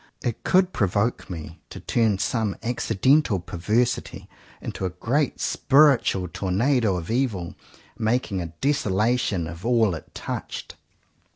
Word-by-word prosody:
It 120 - -3
could 185 0 +3
provoke 100 +3 0
me 80 -2 -7
to - - -8
turn 110 -4 +1
some 110 0 -1
accidental 120 0 +2
perversity 105 +8 -1 0.3
into - - -6
a 95 - 0
great 125 - -1
spiritual 135 -10 +3
tornado 100 +4 +1
of 85 +3 -5
evil, 115 -9 -1 0.5
making 110 -4 0
a 85 - -4
desolation 105 - 0
of 85 +2 -8
all 115 -5 +3
it 80 - -9
touched. - - -5
110 Hz, 120 wpm, -24 LUFS, 90-125 Hz, 0.5 s, could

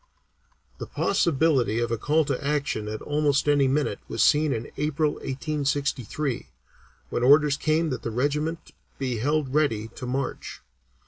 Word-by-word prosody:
The - - -6
possibility 140 - +1
of 120 0 -1
a 115 - 0
call 155 +5 +2
to 140 -1 -2
action 140 -7 -1
at 110 0 -5
almost 145 -1 +1
any 145 -2 +4
minute 140 +3 0
was - - 0
seen 150 0 +4
in 115 -3 -4
April, 150 0 0
1863, 140 -2 -2 0.6
when - - -1
orders 145 +3 +5
came 155 +1 0
that 130 - -3
the - - -3
regiment 150 +7 -2 0.3
be 130 -3 -2
held 145 +1 0
ready 115 -8 +1
to 125 +2 -8
march. 130 +1 -4
140 Hz, 145 wpm, -25 LUFS, 125-150 Hz, 0.6 s, orders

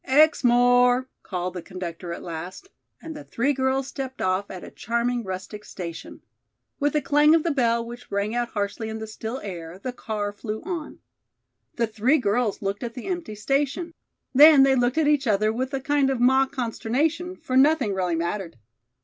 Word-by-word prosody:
"Exmoor!" 250 -3 +4
called 180 -1 -4
the 180 - -5
conductor 175 -1 -7
at 170 - -6
last, 175 - -7 0.3
and 320 -1 -7
the 295 - -8
three 275 +3 0
girls 265 0 0
stepped 265 -1 -6
off 185 +2 0
at 185 - -8
a - - -10
charming 235 +1 -1
rustic 190 +2 -6
station. 170 -5 -8 0.6
With 290 0 0
a 300 - +1
clang 295 +3 +5
of 325 - +2
the 335 - +1
bell 235 -4 +1
which 240 +1 -10
rang 200 +2 -1
out 240 0 0
harshly 205 +2 -3
in 220 - -4
the 220 - -5
still 220 +3 -6
air, 175 -3 -7
the 250 +6 -5
car 210 -4 -3
flew 215 +1 -6
on. 340 -3 -5 0.8
The 235 - +1
three 225 +7 +2
girls 215 -2 0
looked 195 +1 -2
at 235 -1 -5
the 250 - -7
empty 350 - -4
station. 280 - -1 0.4
Then 290 +1 +8
they 270 0 +5
looked 245 +2 +1
at 315 -2 +3
each 290 -3 +2
other 215 +1 +2
with 255 +3 -3
a - - -1
kind 280 0 +1
of 265 -2 -1
mock 265 +2 +4
consternation, 285 +8 -1
for 255 - -5
nothing 265 -5 +4
really 180 -3 0
mattered. 170 +1 -3
240 Hz, 185 wpm, -24 LUFS, 205-275 Hz, 0.8 s, Then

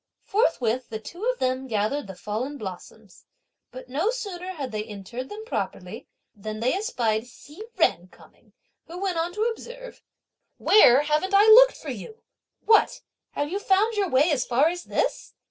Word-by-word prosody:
Forthwith 255 - 0
the 220 - -4
two 345 - -8
of - - 0
them 255 +1 -1
gathered 220 +4 -1
the 190 - -8
fallen 220 +10 -4
blossoms; 200 -1 -10 0.4
but 255 0 -11
no 300 - 0
sooner 380 -7 -5
had 275 -7 -5
they 215 -1 -3
interred 220 +4 -8
them 430 +1 -8
properly - - -5 0.3
than 215 0 -7
they 245 +3 +1
espied 240 - -1
Hsi 295 - -14 0.2
Jen 180 - +2
coming, - - -22 0.3
who 340 +2 -9
went 370 -3 -1
on 335 +1 -1
to 425 +3 -1
observe: 485 +2 -6 0.6
"Where 275 - +6
haven't 305 +6 0
I 405 +1 +7
looked - - +8
for - - -7
you? 445 -1 -10 0.4
What! 440 -1 +4 0.3
have 290 +2 -3
you 395 - -2
found 410 +3 +2
your 405 -3 0
way 290 +5 +3
as 265 -4 +1
far 270 +6 +2
as 350 +1 -6
this! - - -2
295 Hz, 170 wpm, -25 LUFS, -, 0.6 s, looked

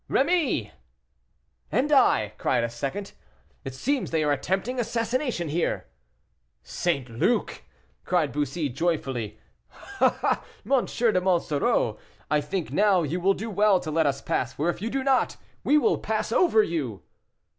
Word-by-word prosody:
"Rémy!" 280 - +1 1.0
"And 265 +7 +1
I?" 110 - +4
cried - - +1
a 115 - -2
second 140 +12 -4
voice, - - -24 0.5
"it 135 -1 -6
seems 270 - -1
they 160 -1 +1
are 150 - +2
attempting 195 - -1
assassination 235 - -1
here." 165 +3 -1 0.8
"St. 140 -8 -1
Luc!" 115 -1 0 0.4
cried 170 -5 +1
Bussy, 145 +2 -1
joyfully. 135 -7 -2 0.6
"Ah! - - +2 0.2
M. 270 -3 +2
de 225 -6 +1
Monsoreau, 170 -6 +1 0.3
I 150 -1 +3
think 155 +1 -4
now 190 +2 +3
you 160 +4 -2
will 195 +2 +3
do 220 +2 -5
well 205 -1 +4
to 155 - -5
let 160 0 +2
us 140 -1 -2
pass, 130 0 -1
for 150 +6 -1
if - - -11
you 225 - -2
do 270 +2 -2
not, 270 -1 +2 0.3
we 295 - +4
will 430 - +2
pass - - -2
over 225 -12 +4
you." 140 - -3
175 Hz, 150 wpm, -26 LUFS, 140-230 Hz, 1.0 s, I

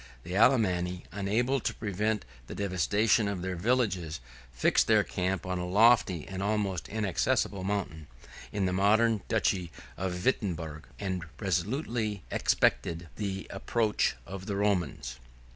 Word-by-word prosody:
The 90 +2 -5
Alemanni, 90 -6 +3
unable 110 +8 0
to - - -2
prevent 105 +1 -1 0.2
the - - -7
devastation 100 +3 +2
of 95 -3 -3
their 95 0 -2
villages, 95 - 0 0.3
fixed - - +3
their - - +5
camp 95 0 -2
on 90 -1 -2
a 90 - -3
lofty, 100 -4 +4
and 95 -1 -5
almost 100 - -1
inaccessible, 105 0 0
mountain, 95 -6 -3 0.4
in 100 -2 0
the 90 - 0
modern 110 +3 +3
duchy 95 -6 0 0.3
of 90 -1 -3
Wirtemberg, 85 - -1
and 95 -3 -3
resolutely 105 - -1
expected 85 0 +1
the 95 -2 -3
approach 110 +2 0
of 95 +1 -8
the 100 - -2
Romans. 85 -12 -1
95 Hz, 130 wpm, -29 LUFS, 90-110 Hz, 0.4 s, their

